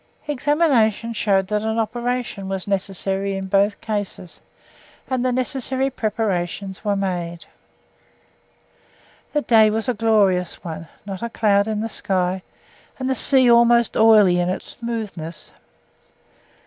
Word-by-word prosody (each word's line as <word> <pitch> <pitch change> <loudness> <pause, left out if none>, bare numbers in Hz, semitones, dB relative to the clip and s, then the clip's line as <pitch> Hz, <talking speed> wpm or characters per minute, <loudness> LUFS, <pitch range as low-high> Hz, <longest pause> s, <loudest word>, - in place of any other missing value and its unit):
Examination 275 -6 +1
showed 195 -3 +1
that 210 0 0
operation 225 -1 -2
was 195 0 -4
necessary 195 0 -1
in 190 - -4
both 200 +2 +1
cases, 205 -5 -5 0.7
and 255 -2 -1
the 255 - +1
necessary 260 +1 -1
preparations 200 -4 -3
were 205 -2 0
made. 175 -3 -3 1.9
The 295 -1 0
day 220 -2 +5
was 220 +2 -2
a 250 - +1
glorious 205 -5 +1
one 165 -1 -7 0.2
not 195 -2 -6
a 235 - -3
cloud 205 -2 +2
in 215 -1 -2
the 225 - -2
sky, 185 -3 -1 0.6
and 260 - -3
the 265 - +1
sea 260 0 +4
almost 235 0 +4
oily 215 -5 +5
in 175 0 0
its 185 - -4
smoothness. 210 -9 -6
215 Hz, 125 wpm, -21 LUFS, 190-235 Hz, 1.9 s, day